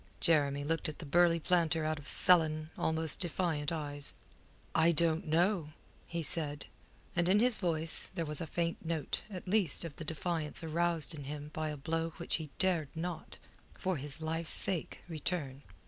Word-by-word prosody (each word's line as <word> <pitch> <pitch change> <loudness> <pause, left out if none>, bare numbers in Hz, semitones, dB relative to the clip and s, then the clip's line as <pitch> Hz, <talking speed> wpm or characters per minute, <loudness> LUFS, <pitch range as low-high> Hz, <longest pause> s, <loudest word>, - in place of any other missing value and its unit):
Jeremy 145 -3 +3
looked 165 +2 -1
at 155 - -8
the - - -8
burly 170 +3 +4
planter 165 -2 +1
out 155 -1 -1
of 145 - -11
sullen, 155 -3 +3
almost 160 -1 0
defiant 165 -4 -1
eyes. 145 -3 -4 0.6
"I 165 +1 +4
don't 165 +2 +1
know," 165 -1 +1 0.3
he 170 -1 -3
said, 145 -1 +2 0.5
and 175 0 +2
in 195 - +5
his 245 0 +4
voice 165 -3 +3
there 165 - -3
was 150 -1 -4
a 165 - -4
faint 170 +1 -2
note 160 -4 -2
at 185 -2 -8
least 185 -5 +2
of 160 - -7
the 165 - -6
defiance 160 0 -2
aroused 165 0 +1
in 145 -3 -8
him 145 +1 -7
by 155 0 -2
a 150 - -5
blow 165 +3 -2
which 170 - -2
he 155 -2 -7
dared 175 -6 +1
not, 165 0 -5 0.4
for 185 -3 -2
his 145 +3 -4
life's 160 +1 +4
sake, 180 -4 -1
return. 155 -4 -3
160 Hz, 175 wpm, -33 LUFS, 150-170 Hz, 0.6 s, in